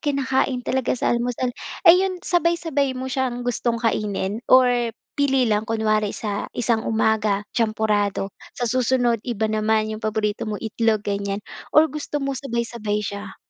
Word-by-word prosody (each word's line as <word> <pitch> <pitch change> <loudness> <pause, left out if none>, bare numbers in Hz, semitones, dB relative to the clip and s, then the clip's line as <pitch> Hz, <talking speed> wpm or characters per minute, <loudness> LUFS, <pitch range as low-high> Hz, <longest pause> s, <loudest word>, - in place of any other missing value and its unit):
kinakain 265 -3 0
talaga 260 -1 0
sa - - +1
almusal. 245 +1 -1 0.3
Ay, 350 +1 +8
yun, 380 -1 0
sabay-sabay 335 -6 +1
mo 260 - -4
siyang 250 -2 -1
gustong 240 -1 0
kainin 210 -2 -1
or 255 0 +7 0.5
pili 270 -2 +2
lang? 215 0 0
Kunwari 215 -2 0
sa 205 -2 -3
isang 230 -1 +1
umaga, 215 -2 +1
champurado, 210 -3 0 0.2
sa 245 - -1
susunod 245 -1 +1
iba 220 -2 -1
naman, 215 0 +1
yong 215 - -6
paborito 215 0 -1
mo 210 - -2
itlog, 220 -1 0
ganyan, 200 0 -2 0.3
or 310 - +9
gusto 300 -1 -4
mo 275 -1 -1
sabay-sabay 235 -5 -2
siya? 200 -1 -6
230 Hz, 145 wpm, -23 LUFS, 215-260 Hz, 0.5 s, or